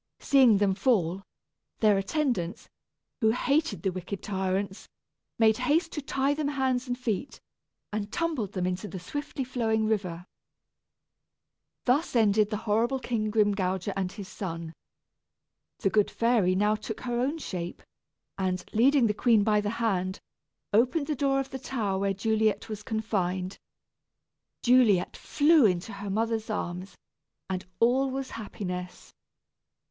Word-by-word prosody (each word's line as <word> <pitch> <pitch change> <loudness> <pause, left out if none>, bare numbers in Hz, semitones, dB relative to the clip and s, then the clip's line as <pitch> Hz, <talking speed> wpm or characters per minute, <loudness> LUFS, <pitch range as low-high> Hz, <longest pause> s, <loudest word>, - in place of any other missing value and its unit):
Seeing 260 -7 +5
them 200 -1 +2
fall, 195 -4 +1 0.6
their 215 -2 +5
attendants, 195 - -1 0.5
who 220 -4 +3
hated 260 - 0
the 190 - +1
wicked 185 +2 -6
tyrants, 190 0 -2 0.5
made 220 -1 +4
haste 310 +7 +1
to 300 - -4
tie 275 0 0
them 295 0 -2
hands 265 -3 0
and 245 0 -2
feet, 245 0 -3 0.5
and 210 -1 -3
tumbled 305 - -2
them 185 -2 -1
into 185 +3 -2
the 190 - -6
swiftly 290 - -4
flowing 225 -4 0
river. 185 -5 -2 1.6
Thus 270 +4 +1
ended 215 -2 +4
the 210 - -2
horrible 230 +5 +2
King 230 -4 -2
Grimgouger 200 -3 +1
and 190 -2 -2
his 200 -2 -8
son. 165 -5 -6 1.0
The 195 - 0
good 210 -2 +3
fairy 230 -6 +2
now 210 +2 +3
took 215 0 -5
her 240 -1 -2
own 275 +6 0
shape, 180 - -5 0.6
and, 185 -1 -1
leading 255 +3 +4
the 210 - +2
queen 220 -1 +3
by 210 0 +3
the 205 - -2
hand, 195 -5 -1 0.5
opened 255 +8 +3
the 300 - -1
door 275 0 +1
of 270 0 -4
the 265 - -5
tower 215 -7 -2
where 195 0 +1
Juliet 220 +1 +1
was 215 -1 -5
confined. 195 -4 -2 1.0
Juliet 235 -7 +4
flew 300 -4 +4
into 180 +3 -2
her 200 0 -6
mother's 225 +2 -1
arms, 185 -2 -4 0.5
and 185 0 -3
all 260 +4 +3
was 265 0 -4
happiness. 180 -4 -6
215 Hz, 140 wpm, -28 LUFS, 190-250 Hz, 1.6 s, Seeing